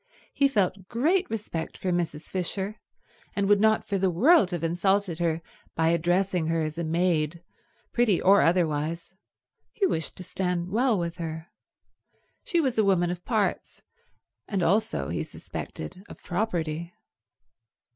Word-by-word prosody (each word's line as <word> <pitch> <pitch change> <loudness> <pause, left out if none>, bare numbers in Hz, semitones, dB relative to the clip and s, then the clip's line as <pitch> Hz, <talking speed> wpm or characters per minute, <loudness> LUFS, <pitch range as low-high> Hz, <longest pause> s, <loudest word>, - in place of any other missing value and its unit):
He 280 - +4
felt 195 -6 0
great 330 +11 +1
respect 200 -7 -4
for 185 - -2
Mrs. 170 -3 -1
Fisher, 190 +3 -3 0.6
and 200 -1 +1
would 205 0 +4
not 220 0 +3
for 200 -2 0
the 190 0 +2
world 220 - +5
have 175 -3 -4
insulted 175 +1 +1
her 165 -1 0 0.3
by 160 0 +2
addressing 175 +1 +1
her 165 0 +1
as 155 +2 -4
a - - -1
maid, 165 -1 0 0.5
pretty 235 -6 +3
or 200 +2 +6
otherwise. 165 0 0 0.6
He 410 - +1
wished 160 - -2
to 185 - -7
stand 180 -1 -2
well 235 +1 +2
with 170 -1 -3
her. 160 -1 -5 0.9
She 345 - +1
was 260 -7 +1
a - - +5
woman 180 -3 +2
of 175 0 -6
parts, 215 -5 -1 0.6
and 195 -4 -1
also, 180 - +1
he 85 - -2
suspected, 80 - -7
of - - -12
property. 170 -4 -2
180 Hz, 145 wpm, -27 LUFS, 165-205 Hz, 0.9 s, or